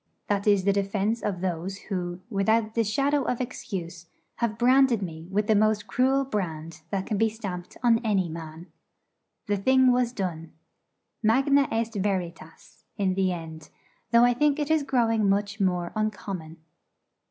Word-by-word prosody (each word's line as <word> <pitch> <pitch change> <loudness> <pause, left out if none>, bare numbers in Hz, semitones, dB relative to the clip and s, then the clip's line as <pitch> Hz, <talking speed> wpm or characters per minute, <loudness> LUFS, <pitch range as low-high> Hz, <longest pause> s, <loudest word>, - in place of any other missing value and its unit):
That 200 0 -1
is 200 -2 +4
the 200 +1 +3
defence 200 +3 -1
of 185 -4 -3
those 185 +1 -3
who, 180 -3 -5
without 220 +1 +1
the 230 - +2
shadow 275 +7 +1
of 250 -2 -2
excuse, 175 -9 -6 0.3
have 230 -2 -1
branded 250 -2 +4
me 165 -2 -7
with 205 +2 0
the 220 - +3
most 215 0 +2
cruel 265 +4 +2
brand 165 - -4
that 195 -1 -2
can 210 - -2
be 225 0 +3
stamped 195 -5 -7
on 230 -2 +4
any 205 -6 0
man. 160 0 -8 0.8
The 205 -3 0
thing 260 +5 +4
was 245 -1 +1
done. 175 -8 -5 0.7
Magna 270 +5 +3
est 225 0 -1
veritas, 175 -5 -5
in 190 -2 +1
the 190 0 +1
end: 160 -3 -7 0.4
though 235 0 +6
I 245 - +4
think 290 +3 +2
it 300 0 -1
is 315 -1 +3
growing 225 -6 +1
much 200 +1 0
more 180 -3 0
uncommon. 190 -6 -4
205 Hz, 160 wpm, -26 LUFS, 180-235 Hz, 0.8 s, though